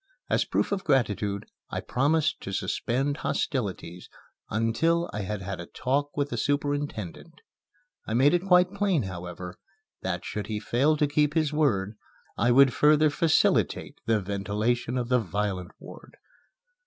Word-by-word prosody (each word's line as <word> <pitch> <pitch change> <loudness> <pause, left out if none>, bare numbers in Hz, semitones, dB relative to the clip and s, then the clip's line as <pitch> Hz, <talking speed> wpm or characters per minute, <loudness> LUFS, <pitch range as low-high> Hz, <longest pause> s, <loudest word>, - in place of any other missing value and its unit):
As - - +2
proof - - 0
of 200 -1 -1
gratitude, 105 - 0 0.2
I - - -3
promised 150 +4 +1
to 95 - -6
suspend 130 +9 -1
hostilities 95 - -3 0.4
until 115 +11 +1
I 105 - -3
had 100 0 -4
had 95 0 -5
a 85 - -7
talk 145 +3 -2
with 145 0 -1
the - - -2
superintendent. 145 - -2 0.7
I 110 - -1
made 135 +6 +5
it 175 +2 0
quite 180 0 +5
plain, 200 - +1
however, 90 -1 -7 0.5
that 90 -1 -3
should 105 - -4
he 105 -1 -3
fail 140 +8 +2
to 150 - +3
keep 150 +1 +1
his 155 -2 +1
word, 110 -9 +1 0.4
I 120 - +1
would 135 +1 +6
further 150 0 +4
facilitate 160 +1 +1
the 110 -1 +3
ventilation 105 +5 -1
of 120 -1 -2
the 125 -1 +4
violent 100 -2 -3
ward. - - -13
125 Hz, 150 wpm, -27 LUFS, 100-150 Hz, 0.7 s, would